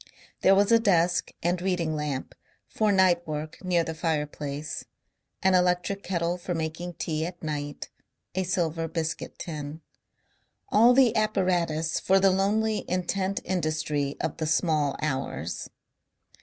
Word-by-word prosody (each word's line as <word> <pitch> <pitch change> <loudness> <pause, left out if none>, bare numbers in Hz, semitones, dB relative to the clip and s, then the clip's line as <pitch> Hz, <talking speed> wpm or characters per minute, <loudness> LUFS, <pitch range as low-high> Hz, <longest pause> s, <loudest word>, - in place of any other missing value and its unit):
There 195 - +6
was 200 +2 +3
a 230 - +7
desk 175 -5 +2
and 175 +1 +1
reading 175 -4 0
lamp 150 -3 -3 0.3
for 215 -1 +1
night 185 -3 +3
work 155 +2 -5
near 175 -2 +2
the 165 - -4
fireplace, 150 -2 -3 0.6
an 190 0 +4
electric 180 +2 +2
kettle 175 -1 -1
for 175 0 -3
making 165 +2 -4
tea 155 0 -2
at 175 -1 -10
night, 145 -2 -4 0.5
a 190 - 0
silver 170 -3 -1
biscuit 160 0 -4
tin; 150 -1 -6 0.9
all 235 +4 +6
the 250 -4 +5
apparatus 180 -7 +1
for 195 +1 +3
the 195 0 +5
lonely 210 +3 +1
intent 190 +2 -1
industry 155 -5 -1
of 160 -1 -2
the 160 - -2
small 155 -3 +1
hours. 130 - -3
170 Hz, 135 wpm, -27 LUFS, 155-190 Hz, 0.9 s, a